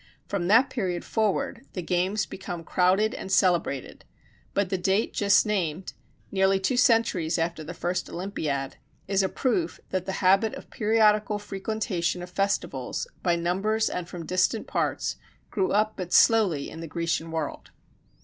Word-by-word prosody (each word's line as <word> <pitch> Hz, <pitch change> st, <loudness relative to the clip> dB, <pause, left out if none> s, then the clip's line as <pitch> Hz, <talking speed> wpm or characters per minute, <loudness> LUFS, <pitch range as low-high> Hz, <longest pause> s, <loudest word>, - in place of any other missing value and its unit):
From 185 Hz, -4 st, -2 dB
that 230 Hz, +7 st, +5 dB
period 185 Hz, -8 st, -2 dB
forward 220 Hz, +2 st, -1 dB
the 180 Hz, -, -4 dB
games 185 Hz, +4 st, 0 dB
become 175 Hz, -3 st, -7 dB
crowded 190 Hz, +6 st, +2 dB
and 190 Hz, -, -6 dB
celebrated: 175 Hz, -9 st, +1 dB, 0.5 s
but 200 Hz, -1 st, +1 dB
the 190 Hz, -, +1 dB
date 195 Hz, +4 st, +1 dB
just 205 Hz, +1 st, +4 dB
named, 185 Hz, -4 st, -2 dB, 0.4 s
nearly 190 Hz, 0 st, +3 dB
two 190 Hz, +7 st, 0 dB
centuries 225 Hz, -10 st, +3 dB
after 165 Hz, -1 st, -2 dB
the 170 Hz, +3 st, -7 dB
first 175 Hz, +1 st, -2 dB
Olympiad, 155 Hz, -7 st, -3 dB, 0.3 s
is 195 Hz, 0 st, +2 dB
a 190 Hz, -, 0 dB
proof 195 Hz, -11 st, -1 dB
that 185 Hz, -1 st, -2 dB
the 190 Hz, -, -2 dB
habit 195 Hz, +3 st, +3 dB
of -, -, -11 dB
periodical 215 Hz, -1 st, +3 dB
frequentation 195 Hz, -4 st, -2 dB
of 180 Hz, -, -9 dB
festivals, 195 Hz, -, -1 dB, 0.2 s
by 175 Hz, -2 st, +2 dB
numbers 195 Hz, +6 st, 0 dB
and 180 Hz, -1 st, -4 dB
from 175 Hz, -3 st, -7 dB
distant 185 Hz, +5 st, +1 dB
parts, -, -, -1 dB, 0.3 s
grew 195 Hz, -4 st, 0 dB
up 215 Hz, +1 st, +2 dB
but 180 Hz, -2 st, -5 dB
slowly 195 Hz, -11 st, +4 dB
in -, -, -9 dB
the 165 Hz, -, -6 dB
Grecian 165 Hz, 0 st, -2 dB
world. 160 Hz, -3 st, -4 dB
190 Hz, 155 wpm, -26 LUFS, 175-210 Hz, 0.5 s, that